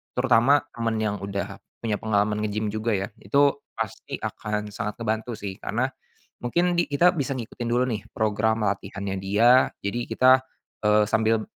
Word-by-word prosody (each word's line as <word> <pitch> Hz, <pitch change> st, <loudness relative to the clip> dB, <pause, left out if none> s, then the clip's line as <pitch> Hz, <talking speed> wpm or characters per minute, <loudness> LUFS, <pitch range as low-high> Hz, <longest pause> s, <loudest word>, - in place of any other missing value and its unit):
terutama 125 Hz, +3 st, +4 dB
temen 115 Hz, -1 st, -2 dB
yang 105 Hz, -1 st, -1 dB
udah 100 Hz, 0 st, -4 dB, 0.2 s
punya 110 Hz, -2 st, -2 dB
pengalaman 105 Hz, 0 st, +1 dB
nge-gym 105 Hz, 0 st, -1 dB
juga 110 Hz, +2 st, -2 dB
ya 95 Hz, -1 st, 0 dB
itu 140 Hz, 0 st, +3 dB, 0.2 s
pasti 110 Hz, -2 st, -4 dB
akan 105 Hz, -1 st, -4 dB
sangat 105 Hz, -2 st, -4 dB
ngebantu 110 Hz, 0 st, -2 dB
sih 100 Hz, -2 st, -5 dB
karena, 125 Hz, +4 st, 0 dB, 0.6 s
mungkin 175 Hz, +8 st, +1 dB
di 175 Hz, -, +4 dB
kita 160 Hz, +5 st, +4 dB
bisa 140 Hz, -2 st, -1 dB
ngikutin 120 Hz, -1 st, -6 dB
dulu 125 Hz, +1 st, +3 dB
nih 110 Hz, -4 st, -3 dB
program 110 Hz, +1 st, +1 dB
latihannya 100 Hz, 0 st, -3 dB
dia 115 Hz, +7 st, +4 dB
jadi 100 Hz, +4 st, -2 dB
kita, 130 Hz, 0 st, +5 dB, 0.5 s
eee, 105 Hz, 0 st, +5 dB
sambil, 110 Hz, 0 st, +2 dB
110 Hz, 155 wpm, -25 LUFS, 105-120 Hz, 0.6 s, kita